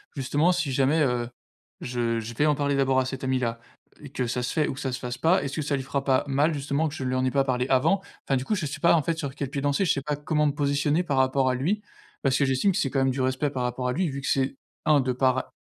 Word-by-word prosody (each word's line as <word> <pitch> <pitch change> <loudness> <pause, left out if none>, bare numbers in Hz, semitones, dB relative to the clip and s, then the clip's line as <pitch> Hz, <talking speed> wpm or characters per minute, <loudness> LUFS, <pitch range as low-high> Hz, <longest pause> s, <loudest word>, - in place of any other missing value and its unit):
justement 145 +5 +2
si 175 -6 -1
jamais, 135 +4 +2
heu, 125 -4 +1 0.5
je 120 -2 -1
je 115 +1 -6
vais 145 - +2
en 150 - +4
parler 145 -1 0
d'abord 135 -1 +2
à 130 - +1
cette 130 0 -5
amie-là 125 -3 -1 0.4
et 145 - -10
que 125 -3 -2
ça 125 +1 -2
se 125 - -2
fait 155 -2 +1
ou - - -2
que - - -9
ça 135 -3 -2
se 125 - -4
fasse 125 -1 -5
pas, 170 +8 +3
est-ce 140 -1 -4
que 155 - -2
ça 140 0 0
lui 135 - -2
fera 140 +1 -2
pas 130 -2 +3
mal 145 +4 +2
justement 145 +2 -1
que 145 - -6
je 155 - -7
ne - - -2
lui 130 - -1
en 130 0 +1
ai 130 - +1
pas 140 0 +2
parlé 125 -2 0
avant? 135 +9 +3 0.3
Enfin 135 - +2
du 130 - -4
coup, - - 0
je 185 -7 -1
sais 145 +2 -6
pas 170 - +5
en 165 - +4
fait 165 +2 -2
sur 140 -4 -4
quel 140 -1 -4
pied 140 0 -3
danser, 145 +6 +1
je - - +3
sais 140 - -2
pas 150 +1 -1
comment 150 +1 0
me 145 - +3
positionner 145 +2 +1
par 145 -6 -2
rapport 130 0 +3
à 130 - +1
lui, 175 +12 -1 0.4
parce 135 -2 +2
que 140 - +2
j'estime 135 +9 +2
que - - -2
c'est 135 - 0
quand 135 - +1
même 135 0 +3
du 130 +1 -1
respect 130 +3 0
par 130 -3 -3
rapport 125 +1 -2
à - - +1
lui, 180 +5 0
vu 140 0 -5
que 135 - -5
c'est 135 0 +1 0.3
1, 150 -2 +5
de 130 -1 -1
par 130 0 +1
135 Hz, 315 wpm, -26 LUFS, 130-150 Hz, 0.5 s, pas